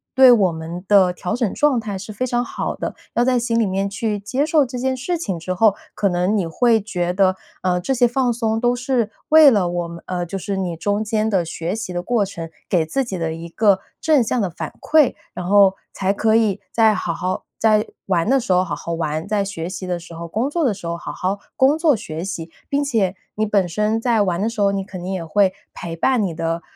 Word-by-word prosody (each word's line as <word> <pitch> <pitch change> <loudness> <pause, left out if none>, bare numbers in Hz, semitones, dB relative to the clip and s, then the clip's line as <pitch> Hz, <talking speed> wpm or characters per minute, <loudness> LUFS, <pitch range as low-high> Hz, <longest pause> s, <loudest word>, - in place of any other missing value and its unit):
对 260 -1 +8
我 200 -7 +4
们 165 +2 -6
的 195 -3 +5
调 180 +2 -3
整 235 -5 -1
状 295 -3 +2
态 210 -3 -4
是 200 +3 -8
非 250 +5 -2
常 245 -1 0
好 - - -4
的。 - - -4 0.2
要 240 - +3
在 255 -1 +3
心 235 -1 0
里 225 - +3
面 195 +1 -1
去 210 +1 -2
接 260 +8 -1
受 310 -3 +3
这 250 0 -6
件 260 +1 0
事 345 +7 -2
情 195 - -3
之 185 +3 -3
后， 205 +2 +4 0.2
可 210 - 0
能 180 +3 +1
你 180 - 0
会 230 +7 +3
觉 180 -4 -2
得， 185 0 +3 0.3
呃， 180 -1 +1
这 265 - 0
些 245 -1 +4
放 245 0 +1
松 225 -1 -1
都 245 0 +3
是 245 -3 -1 0.2
为 310 -2 +8
了 200 -6 +2
我 175 -1 -2
们 170 0 -9
呃， 180 -1 -2
就 195 +3 -5
是 195 +1 -3
你 180 -3 -2
中 205 +5 0
间 215 0 0
的 190 -5 +2
学 165 +3 -3
习 215 -4 -5
的 175 - -2
过 230 +3 +1
程， 170 -4 -7 0.2
给 170 -4 +2
自 270 +13 -1
己 195 -7 -5
的 165 -1 -2
一 165 +1 -8
个 200 +1 +3 0.2
正 300 -5 +3
向 235 +2 0
的 195 - 0
反 170 - -6
馈。 310 -4 +3 0.2
然 180 - -5
后 195 0 +5 0.2
才 195 0 0
可 220 +2 +2
以 210 -3 +1
再 220 -2 +4
好 175 -2 -2
好 185 +3 -3 0.2
在 215 -1 +3 0.2
玩 180 +1 +1
的 270 +1 +4
时 210 -6 0
候 180 0 +4
好 170 -5 -4
好 170 +2 -5
玩， 160 +1 -2
在 205 -1 +1
学 185 -4 -5
习 185 0 -6
的 175 -1 -2
时 170 0 -12
候 165 +1 -7
工 230 - -1
作 335 +2 -1
的 240 - +2
时 190 -4 -8
候 170 - -2
好 - - -6
好 190 +2 -2 0.2
工 275 +3 +4
作 320 -3 +4
学 160 -6 -6
习。 170 -3 -5 0.2
并 285 +1 +1
且 215 -9 0 0.2
你 215 - 0
本 200 -4 +2
身 210 +5 0
在 230 -2 +2
玩 180 -2 -1
的 220 - +1
时 230 - -8
候， 200 - +4
你 195 -1 -2
肯 190 -2 -9
定 185 - -4
也 185 -3 -3
会 190 +3 +2 0.2
陪 170 -2 -6
伴 250 +8 +2
你 185 -4 -2
的， 165 +1 -2
200 Hz, 265 characters per minute, -20 LUFS, 180-235 Hz, 0.3 s, 对